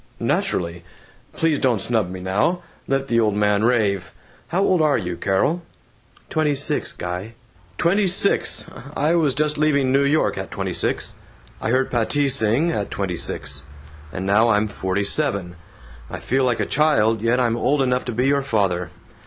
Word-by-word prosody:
"Naturally! 85 -1 -1 0.5
Please 160 -3 +1
don't 125 -4 +2
snub 110 -4 +1
me 95 0 -7
now! 100 - 0 0.2
Let 135 0 0
the 115 -2 +2
old 105 -3 +2
man 105 0 +2
rave. 100 -8 +1 0.4
How 185 +3 0
old 185 -4 +2
are 150 -2 +3
you, 90 -4 -4
Carol?" 95 - 0 0.7
"Twenty 155 -2 0
six, 145 +2 0
Guy." 90 +6 -6 0.4
"Twenty 195 +4 +2
six! 185 +2 +1 0.3
I 150 +3 +2
was 155 -6 +2
just 150 +1 0
leaving 140 -4 +2
New 140 +1 +3
York, 145 +3 +1
at - - -5
twenty - - -4
six. - - -1 0.5
I - - -2
heard 130 +2 +1
Patti 135 +4 +1
sing, 130 +6 +2
at 105 -10 -2
twenty 95 -3 -3
six. 70 -3 -1 0.5
And 90 +4 -5
now 105 +4 +3
I'm 105 0 +2
forty 95 -1 -2
seven. 100 -7 0 0.5
I - - -5
feel 130 +1 0
like 120 -2 0
a - - 0
child, 115 -8 +2
yet 115 +2 +2
I'm 120 -2 +1
old 130 +5 +1
enough 125 -1 0
to 125 - -3
be 120 +3 0
your 140 +1 +2
father. 95 -9 0
120 Hz, 170 wpm, -21 LUFS, 100-145 Hz, 0.7 s, are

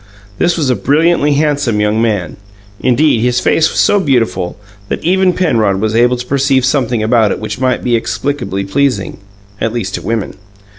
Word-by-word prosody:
This 175 0 +1
was 145 -6 +1
a - - +1
brilliantly 150 +1 +2
handsome 145 -6 0
young 105 +1 +1
man; 100 -8 -1 0.4
indeed, 125 -1 +2
his 125 +1 +1
face 160 +4 +2
was - - -6
so 205 - +3
beautiful 120 - -1 0.3
that - - -3
even 185 +1 +2
Penrod 115 - +1
was 110 +1 -1
able 120 +2 +3
to 125 - -6
perceive 135 -1 +1
something 125 -4 0
about 110 -1 +3
it - - -2
which 110 +3 -6
might 130 -1 0
be 125 - -1
explicably 115 -4 -2
pleasing 125 -4 -1 0.4
at 115 - 0
least 105 -6 -3
to - - -3
women. 115 -3 -3
125 Hz, 180 wpm, -14 LUFS, 110-145 Hz, 0.4 s, so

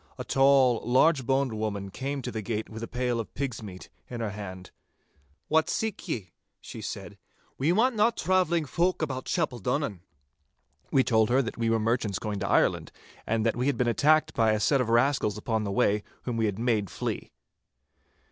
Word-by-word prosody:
A - - -4
tall, 135 -3 +4
large 130 +2 +3
boned 135 -2 +1
woman 100 -3 -3
came 135 +3 -4
to - - -4
the 110 - -4
gate 110 +1 -4
with 110 0 -7
a 115 - -4
pail 125 -1 -1
of 105 -6 -5
pigs' 130 -4 -3
meat 95 -4 -9 0.2
in 120 - -5
her 110 -3 -2
hand. 95 -3 -8 0.8
'What 160 +1 +2
seek 220 -3 -3
ye?' 105 - -4 0.3
she - - -9
said. - - -7 0.4
'We 150 +6 +2
want 235 +5 +3
nae 215 +2 +4
travelling 180 -6 +1
folk 175 +4 0
about 130 -4 -3
Chapeldonnan.' 135 - -1 0.9
We 135 - +4
told 110 -3 +3
her 130 +3 +3
that 115 - -6
we 115 -1 +1
were 115 - +3
merchants 110 -3 0
going 105 -2 -4
to - - -2
Ireland, - - +2 0.4
and 115 0 0
that 115 - +2
we 125 +3 -1
had 140 - +1
been 125 - +1
attacked 155 +6 +3
by 110 -2 +3
a 105 - 0
set 135 +6 +3
of 120 - -2
rascals 120 -3 +2
upon 110 0 -1
the 100 - -2
way, 100 +1 +2 0.2
whom 125 - -3
we 110 -1 +1
had 100 -2 -3
made 110 -4 0
flee. - - -4
120 Hz, 195 wpm, -27 LUFS, 110-140 Hz, 0.9 s, tall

